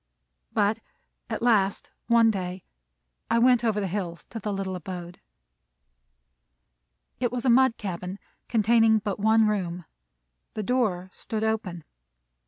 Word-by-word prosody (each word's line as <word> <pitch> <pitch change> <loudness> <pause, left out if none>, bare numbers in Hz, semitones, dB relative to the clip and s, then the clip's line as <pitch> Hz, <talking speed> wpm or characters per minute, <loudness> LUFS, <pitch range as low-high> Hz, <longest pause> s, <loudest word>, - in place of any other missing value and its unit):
But - - +1 0.5
at - - -3
last 205 -5 +2 0.2
one 230 -1 +5
day 185 -2 -5 0.7
I 230 - +3
went 245 0 +4
over 220 -3 +1
the 200 - -1
hills 180 -3 -4
to 225 - -5
the 210 0 -3
little 195 -1 -3
abode. 175 0 -7 2.0
It 245 -2 0
was 250 +1 -3
a 250 - +5
mud 260 -1 +4
cabin, 185 -1 -5 0.3
containing 225 0 +4
but 205 -2 -3
one 220 +1 +4
room. 180 -5 -2 0.7
The 215 - -2
door 190 -6 0
stood 220 -1 -4
open. 210 -7 -2
210 Hz, 130 wpm, -26 LUFS, 185-230 Hz, 2.0 s, one